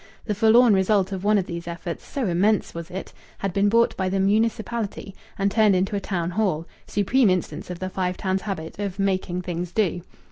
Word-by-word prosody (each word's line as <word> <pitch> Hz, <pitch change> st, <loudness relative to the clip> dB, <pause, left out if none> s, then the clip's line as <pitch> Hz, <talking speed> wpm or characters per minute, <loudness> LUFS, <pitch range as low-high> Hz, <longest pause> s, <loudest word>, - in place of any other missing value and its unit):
The 210 Hz, -, -1 dB
forlorn 225 Hz, +3 st, +5 dB
result 195 Hz, 0 st, +2 dB
of 190 Hz, -1 st, -4 dB
one 210 Hz, +1 st, +4 dB
of 190 Hz, -, 0 dB
these 170 Hz, -1 st, -6 dB
efforts 170 Hz, 0 st, -6 dB
so 270 Hz, -3 st, -2 dB
immense 200 Hz, +4 st, +1 dB
was 170 Hz, -1 st, -7 dB
it! 190 Hz, +2 st, -7 dB, 0.2 s
had 195 Hz, -2 st, -3 dB
been 200 Hz, +1 st, +3 dB
bought 230 Hz, +2 st, +3 dB
by 190 Hz, -1 st, -1 dB
the 195 Hz, +1 st, 0 dB
municipality 220 Hz, 0 st, 0 dB, 0.2 s
and 200 Hz, -1 st, +1 dB
turned 215 Hz, -3 st, +4 dB
into 195 Hz, +3 st, 0 dB
a -, -, 0 dB
Town 175 Hz, -3 st, -2 dB
Hall 180 Hz, -5 st, 0 dB, 0.2 s
supreme 215 Hz, +3 st, +3 dB
instance 180 Hz, -4 st, -2 dB
of 180 Hz, -, -5 dB
the 185 Hz, -, -4 dB
Five 185 Hz, -1 st, -2 dB
Towns' 190 Hz, 0 st, -1 dB
habit 190 Hz, -4 st, -5 dB
of 200 Hz, -2 st, -3 dB
"making 185 Hz, -2 st, -1 dB
things 175 Hz, 0 st, -4 dB
do!" 180 Hz, -4 st, 0 dB
195 Hz, 205 wpm, -24 LUFS, 180-210 Hz, 0.2 s, forlorn